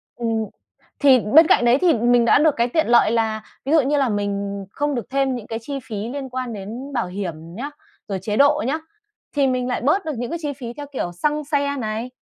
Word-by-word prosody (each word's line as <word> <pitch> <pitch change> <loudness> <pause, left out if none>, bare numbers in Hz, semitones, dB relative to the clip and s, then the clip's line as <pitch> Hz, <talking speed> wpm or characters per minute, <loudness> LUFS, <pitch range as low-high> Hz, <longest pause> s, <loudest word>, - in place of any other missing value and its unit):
Ừm, 225 -2 -1 0.5
thì 270 -3 +6
bên 295 +10 +6
cạnh 240 - +4
đấy 240 +2 +5
thì 350 -3 +5
mình 240 +1 +3
đã 235 - +5
được 305 -1 +4
cái 235 +1 +2
tiện 315 +2 +1
lợi 235 -2 +5
là 220 -1 0 0.2
ví 280 - -1
dụ 320 -2 +6
như 285 +3 +1
là 270 -4 +2
mình 200 -1 -2
không 290 -1 -1
được 240 -1 -5
thêm 270 -1 0
những 225 -3 -7
cái 225 0 -4
chi 275 +3 -5
phí 220 - -7
liên 270 -1 -5
quan 250 -2 -4
đến 230 +8 -7
bảo 235 -7 -1
hiểm 185 -2 -4 0.2
nhá, 270 +7 -4 0.4
rồi 195 -2 -3
chế 210 +1 -2
độ 285 -5 +4
nhá, 290 - 0 0.6
thì 280 -2 +3
mình 255 -1 0
lại 250 - -2
bớt 305 +10 +2
được 315 - -2
những 245 +2 -3
cái 335 - -3
chi 290 -2 -2
phí 240 -3 -7
theo 290 +2 -7
kiểu 175 - -2
xăng 295 - -1
xe 285 -1 0
này, 225 +1 -3
245 Hz, 240 wpm, -21 LUFS, 220-285 Hz, 0.6 s, thì